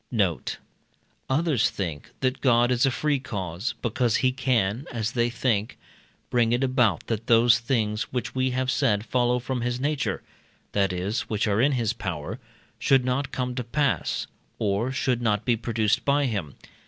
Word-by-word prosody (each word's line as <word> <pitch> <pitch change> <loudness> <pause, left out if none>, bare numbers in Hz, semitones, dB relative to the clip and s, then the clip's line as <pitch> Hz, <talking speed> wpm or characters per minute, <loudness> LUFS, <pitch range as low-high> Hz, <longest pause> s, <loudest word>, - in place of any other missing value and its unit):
Note. 100 -9 0 0.7
Others 145 -3 +2
think 85 -7 -5
that 130 0 0
God 120 -1 +4
is 125 +2 +3
a - - +4
free 145 +2 0
cause, 100 -4 -4
because 120 0 +1
he 130 - +3
can, 125 -3 0
as 110 -1 -2
they 120 -1 +1
think, 115 -3 -1 0.5
bring 120 -1 +3
it 125 +2 +1
about, 120 - +2
that 115 0 -3
those 115 -1 +5
things 110 -3 -1
which 125 -1 -3
we 130 0 +1
have 130 +1 0
said 110 -7 +1
follow 125 0 +2
from 125 0 -3
his 120 +1 -1
nature 145 +2 -1 0.5
that 100 -2 +1
is, 95 +5 -2
which 110 0 0
are 105 +2 +2
in 140 +3 +3
his 115 -3 0
power, 85 -10 -5 0.4
should 135 -2 +3
not 130 +2 -1
come 125 -1 -2
to 125 0 -3
pass, 140 +4 0 0.3
or 105 +4 0
should 130 -2 0
not 105 -2 +1
be 120 - +3
produced 110 -2 0
by 140 0 +2
him. 100 - -3
120 Hz, 170 wpm, -25 LUFS, 105-130 Hz, 0.7 s, those